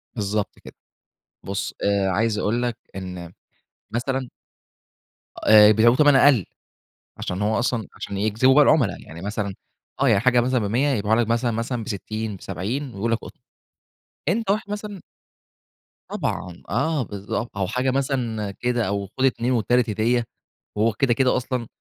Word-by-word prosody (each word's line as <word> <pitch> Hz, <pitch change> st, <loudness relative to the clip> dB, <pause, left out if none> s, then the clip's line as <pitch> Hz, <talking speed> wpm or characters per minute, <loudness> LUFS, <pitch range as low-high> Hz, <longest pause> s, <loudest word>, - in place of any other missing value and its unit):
بالضبط 105 Hz, -1 st, -2 dB
كده. -, -, -13 dB, 0.7 s
بُص 100 Hz, 0 st, -4 dB
آآ 100 Hz, -1 st, +2 dB
عايز 110 Hz, +3 st, +1 dB
أقول 115 Hz, +4 st, 0 dB
لك 120 Hz, -2 st, -1 dB, 0.2 s
إن 90 Hz, -3 st, -7 dB, 0.6 s
مثلًا 130 Hz, +2 st, -2 dB, 1.1 s
آآ 105 Hz, -1 st, +7 dB
بيبعيوه 115 Hz, +3 st, +5 dB
بتَمَن 145 Hz, 0 st, +5 dB
أقَل، 135 Hz, -7 st, +5 dB, 0.7 s
عشان 90 Hz, +3 st, -3 dB
هو 110 Hz, +1 st, +1 dB
أصلًا 120 Hz, -2 st, -1 dB
عشان 100 Hz, -, -6 dB
يجذبوا 110 Hz, +6 st, +3 dB
بقى 150 Hz, +1 st, +7 dB
العُملا. 140 Hz, -10 st, +3 dB
يعني 80 Hz, +2 st, -11 dB
مثلًا 100 Hz, 0 st, -3 dB, 0.5 s
آه. 140 Hz, -, +4 dB
يعني 105 Hz, -4 st, +4 dB
حاجة 125 Hz, +1 st, +4 dB
مثلًا 125 Hz, +1 st, +1 dB
ب100، 115 Hz, +7 st, +1 dB
يبيعه 110 Hz, -4 st, +1 dB
لك 115 Hz, -1 st, +1 dB
مثلًا، 120 Hz, +1 st, +1 dB
مثلًا 115 Hz, +1 st, -2 dB
ب60، 110 Hz, 0 st, -4 dB
ب70 120 Hz, +10 st, -4 dB
ويقول 110 Hz, +4 st, -1 dB
لك 115 Hz, -, +2 dB
قُطن. -, -, -13 dB, 0.9 s
أنت 215 Hz, +3 st, 0 dB
واحد 205 Hz, 0 st, -1 dB
مثلّا 205 Hz, -2 st, -5 dB, 1.1 s
طبعًا. 90 Hz, -2 st, -4 dB
آه 155 Hz, -4 st, 0 dB
بالضبط. 105 Hz, +1 st, -5 dB
أو 95 Hz, -2 st, 0 dB
حاجة 125 Hz, +4 st, 0 dB
مثلًا 125 Hz, -6 st, -1 dB
كده 120 Hz, +1 st, -1 dB
أو 100 Hz, 0 st, -2 dB
خُد 130 Hz, +7 st, -1 dB
2 125 Hz, -1 st, +1 dB
والتالت 120 Hz, 0 st, +2 dB
هديّة 115 Hz, +3 st, +1 dB, 0.5 s
وهو 110 Hz, +2 st, +2 dB
كده، 120 Hz, +4 st, +1 dB
كده 130 Hz, +1 st, +2 dB
أصلًا 125 Hz, -1 st, -2 dB
115 Hz, 150 wpm, -23 LUFS, 105-130 Hz, 1.1 s, آآ